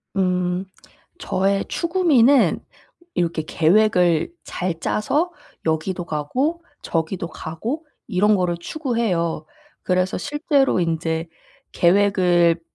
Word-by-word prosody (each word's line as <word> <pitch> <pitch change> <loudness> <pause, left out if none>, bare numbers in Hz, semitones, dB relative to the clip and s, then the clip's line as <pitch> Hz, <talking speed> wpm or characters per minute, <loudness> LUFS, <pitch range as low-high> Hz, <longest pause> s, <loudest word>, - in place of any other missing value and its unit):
음. 180 0 0 0.5
저의 195 +1 0
추구미는 305 -8 +3 0.6
이렇게 165 -2 0
계획을 175 - +2
잘 175 -2 -4
짜서 295 - 0 0.3
여기도 170 +3 -1
가고 260 - -2 0.2
저기도 165 +1 -2
가고 225 - -5 0.2
이런 210 +3 +3
거를 180 -3 0
추구해요. 190 - -2 0.4
그래서 185 0 0
실제로 285 - +1
인제 165 -1 -1 0.5
계획을 175 -2 +3
185 Hz, 210 characters per minute, -22 LUFS, 170-230 Hz, 0.6 s, 추구미는